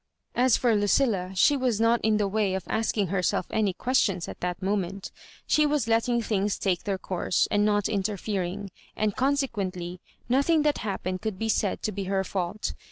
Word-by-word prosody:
As 250 0 +4
for 235 -3 +2
Lucilla, 205 -2 +2
she 285 +10 +5
was 250 -5 0
not 230 +1 +3
in 215 -1 +2
the 205 -1 +1
way 200 -1 0
of 190 - -3
asking 215 -4 0
herself 180 -1 0
any 215 -3 +1
questions 195 -5 0
at - - -8
that 180 0 -3
moment 195 0 -2 0.3
She 305 - +3
was 290 -6 0
letting 230 +1 +2
things 205 -2 0
take 185 +1 -1
their 200 -2 -1
course, 185 -1 0
and 205 0 +3
not 205 -1 +2
interfering; 200 -1 -2 0.2
and 215 -2 0
consequently, 200 -11 -1 0.3
nothing 280 +6 +3
that 295 -1 +1
happened 185 -3 -3
could 215 -4 -3
be 225 +3 -2
said 205 -3 0
to 215 - 0
be 200 -1 -4
her 190 0 0
fault. 190 +2 -3
205 Hz, 180 wpm, -27 LUFS, 190-230 Hz, 0.3 s, she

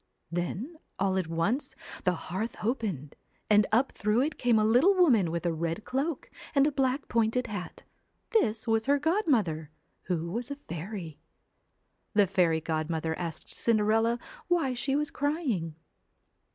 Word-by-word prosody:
Then 185 - -3 0.2
all 195 -1 +1
at 180 - -2
once 200 - -1 0.3
the 180 -1 +3
hearth 190 +8 -4
opened, 205 - -2 0.4
and 210 -1 +6
up 245 +5 +3
through 210 +4 +1
it 290 +2 -2
came 240 -3 +3
a 215 - +3
little 255 - +5
woman 250 - +4
with 170 +1 -3
a 170 - +1
red 165 +4 -3
cloak 275 +3 -2 0.2
and 275 0 +5
a 300 - +2
black 270 0 0
pointed 230 +2 +1
hat 205 -6 -6 0.5
This 230 - +2
was 225 +1 +1
her 285 +1 +4
godmother, 260 - +1 0.4
who 170 -2 -2
was 235 +4 -3
a 280 - -3
fairy. 170 - -7 1.0
The 205 -1 +6
fairy 175 -4 +2
godmother 160 0 -1
asked 170 -3 -5
Cinderella 225 +1 +2 0.3
why 335 -7 +2
she 270 +3 -1
was 300 +1 0
crying. 275 - -1
220 Hz, 150 wpm, -29 LUFS, 170-270 Hz, 1.0 s, and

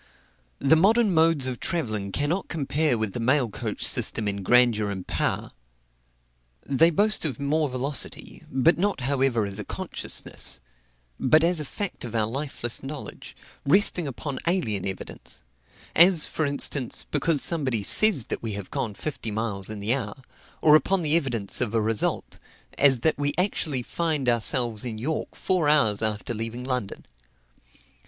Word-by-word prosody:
The 140 +3 +3
modern 210 +4 +3
modes 160 -4 +3
of 130 -1 -4
travelling 110 - -3
cannot 150 - -1
compare 150 -3 -1
with 110 -3 -1
the - - -5
mail 125 0 +1
coach - - -4
system 110 - 0
in 100 0 -1
grandeur 115 0 +3
and 95 -2 -6
power. - - -2 1.1
They 155 +5 +3
boast 210 +6 +2
of 150 -3 -2
more 150 +1 0
velocity, 130 +1 -1
but 145 +7 +2
not 200 -6 -1
however 130 -4 0
as 100 +1 -7
a - - -4
consciousness, - - -5 0.6
but 155 +5 +4
as 170 0 +3
a 150 - -3
fact 200 +7 -5
of 120 -2 -7
our 110 -1 +2
lifeless 120 -1 -3
knowledge, 140 +1 -9 0.3
resting 180 0 +3
upon 135 +1 -6
alien 110 - 0
evidence; 95 -8 -7 0.5
as, 170 -1 +6
for 155 - -2
instance, 140 -2 -1
because 150 0 +1
somebody 130 -10 0
says 175 - +7
that - - -4
we 110 -2 -4
have 100 -1 -8
gone 105 -4 -3
fifty 145 -4 -5
miles 105 -3 -1
in 110 -1 -5
the 105 +4 0
hour, 110 -6 -4 0.5
or 150 -1 +7
upon 175 +5 +2
the 155 0 +1
evidence 120 -12 -1
of 115 -2 -1
a - - +3
result, 110 0 -2 0.4
as 135 -4 +4
that 160 - +1 0.2
actually 180 -6 -1
we 125 - -4
find 155 -2 -2
ourselves 120 -1 +1
in 115 -3 -5
York 150 +8 -4
four 180 -6 0
hours 110 -9 +3
after 110 +1 -2
leaving 115 +2 -6
London. 125 -6 -4
130 Hz, 160 wpm, -25 LUFS, 110-155 Hz, 1.1 s, says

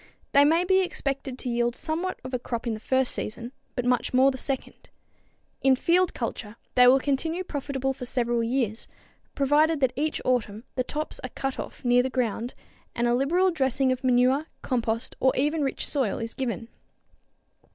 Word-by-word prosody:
They 280 - +6
may 325 +4 +4
be 375 +1 +3
expected 275 -7 -2
to 255 - -4
yield 240 0 0
somewhat 335 +6 -3
of 255 0 -8
a 250 - 0
crop 235 -1 -4
the 225 -3 -2
first 260 +3 +1
season, 235 +3 -4 0.2
but 245 - -2
much 250 0 +1
more 265 +2 +6
the - - -6
second. 270 -1 -5 0.7
In 270 -1 +5
field 350 +6 +2
culture 230 -2 -4 0.2
they 250 0 +7
will 255 +2 +7
continue 320 +6 -1
profitable 270 -4 -2
for 255 -1 -7
several 240 -2 0
years, 230 -2 -1 0.5
provided 295 +3 +3
that 260 -2 +2
each 300 +3 -1
autumn 225 -4 0
the 255 - 0
tops 305 +4 -4
are 255 - -4
cut 270 +1 -4
off - - -7
near 245 0 +5
the 260 - -1
ground 245 -1 -2 0.4
and 240 0 +1
a 240 - +3
liberal 345 +9 +2
dressing 265 -4 +1
of 255 +1 -2
manure, 255 +4 +3 0.2
compost 230 -2 -1
or 260 - +3
even 300 +4 +1
rich 270 -2 -1
soil 265 -8 0
is 230 0 -4
given. 235 -3 -4
260 Hz, 180 wpm, -26 LUFS, 245-285 Hz, 0.7 s, they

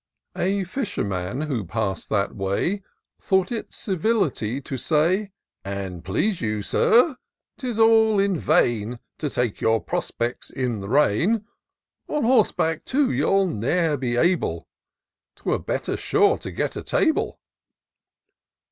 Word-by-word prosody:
A 195 +2 0
fisherman, 130 - -3
who 140 -8 -2
pass'd 100 +1 -3
that 100 -2 0
way, 100 - -1 0.4
Thought 190 +3 +1
it 230 - -4
civility 180 - 0
to 135 0 -6
say: 170 - +1 0.2
" - - -64
An' 95 -3 -5
please 140 - -1
you. 105 -3 -1
Sir, 250 - +3 0.4
'tis 245 -5 -3
all 225 -1 +5
is 195 -4 +1
vain 120 -7 +2 0.2
To 150 - -1
take 125 -5 -2
your 110 0 +3
prospects 120 +3 -3
in 125 -5 -2
the 100 0 -7
rain; 150 - +2 0.6
On 300 - -1
horseback, 210 -9 +2
too, 265 -1 +1
you'll 195 0 +2
ne'er 160 - 0
be 125 -3 -2
able; 175 +8 +1 0.7
'Twere - - -1
better - - -2
sure 415 +1 +2
to - - -6
get - - -2
a - - -4
table." 315 -2 0
155 Hz, 130 wpm, -24 LUFS, -, 0.7 s, all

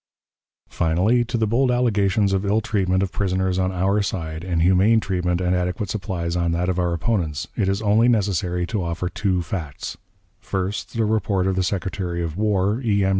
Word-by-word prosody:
Finally, 95 +9 +2
to 120 +1 -3
the 110 - +1
bold 125 +5 +2
allegations 105 -5 +2
of 95 0 0
ill 105 +2 +2
treatment 95 -5 0
of 95 - -2
prisoners 95 -1 0
on 95 0 +1
our 95 +3 +1
side, 80 -5 -4
and 85 -3 0
humane 95 +5 +4
treatment 90 -4 -1
and 90 0 +1
adequate 90 +2 -2
supplies 90 -4 -3
on 85 -1 0
that 90 +2 0
of 90 0 0
our 90 -1 +1
opponents, 85 -3 -1
it 100 -3 +1
is 100 +3 -1
only 110 +3 +4
necessary 95 -6 +1
to 105 +2 -2
offer 85 +1 -2
two 95 -2 -1
facts: 80 -6 -5 0.4
First, 95 +4 -4
the 115 - +2
report 105 -3 +1
of 95 -1 +1
the 95 - +1
Secretary 90 -1 -2
of 80 -2 -4
War, 105 +2 +1
E. 100 -4 +2
M. - - +2
95 Hz, 190 wpm, -22 LUFS, 90-105 Hz, 0.4 s, humane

